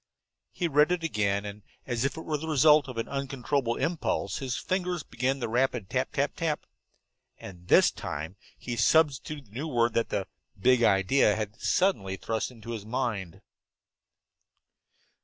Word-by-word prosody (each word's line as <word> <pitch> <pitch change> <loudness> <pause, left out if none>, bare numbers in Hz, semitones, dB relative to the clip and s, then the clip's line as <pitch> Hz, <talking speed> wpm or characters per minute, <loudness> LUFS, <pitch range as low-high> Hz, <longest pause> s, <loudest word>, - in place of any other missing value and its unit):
He 175 - -1
read 150 +2 +4
it 180 -2 0
again, 100 -9 0
and 105 +1 -7 0.2
as 120 -2 -1
if 140 +3 -1
it 160 - -6
were 155 -2 -1
the 160 - -6
result 150 -1 +5
of 130 -3 -8
an 115 - -2
uncontrollable 135 -2 -1
impulse, 160 - -1
his 130 -3 -3
fingers 180 -3 -2
began 130 +3 -1
the 125 - -3
rapid 120 -3 0
tap - - -1
tap - - 0
tap. - - -2 0.7
And 90 -2 -11
this - - +6
time 80 +5 -6 0.2
he 120 - -5
substituted 145 +3 +2
the 115 - -7
new 155 - -3
word 120 -5 +1
that 115 - 0
the 95 - -1 0.3
big 125 +3 +4
idea 105 +2 +4
had 110 0 -5
suddenly 105 - +1
thrust 110 +3 -2
into 115 -2 -10
his 110 -3 -5
mind. 110 -6 -3
125 Hz, 160 wpm, -28 LUFS, 105-150 Hz, 0.7 s, this